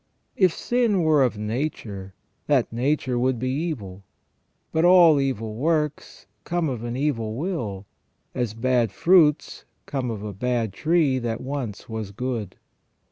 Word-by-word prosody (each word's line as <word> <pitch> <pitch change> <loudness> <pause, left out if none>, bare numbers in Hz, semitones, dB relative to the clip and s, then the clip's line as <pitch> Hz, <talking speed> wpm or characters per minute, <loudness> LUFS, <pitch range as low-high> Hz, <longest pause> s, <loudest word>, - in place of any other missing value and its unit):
If 185 -3 +4
sin 230 -3 +1
were 155 -2 +4
of 125 -5 +1
nature, 105 -4 -4 0.3
that 135 -6 +2
nature 125 0 0
would 130 0 +1
be 130 +2 -2
evil 135 - -3
j 100 - -19 0.7
but 160 - +1
all 175 -4 +7
evil 115 -5 -2
works 150 +4 -2 0.2
come 175 -3 -1
of 120 -4 -4
an 120 +1 -4
evil 115 -7 -1
will, 120 - -3 0.5
as 120 -4 -2
bad 120 -2 +1
fruits 160 - +3 0.2
come 130 -3 -3
of 105 -3 -5
a 105 -1 -5
bad 115 0 -1
tree 155 - +2
that 115 -1 -3
once 130 -6 -5
was 110 -3 -5
good. 110 -2 -4
130 Hz, 145 wpm, -24 LUFS, 110-150 Hz, 0.7 s, all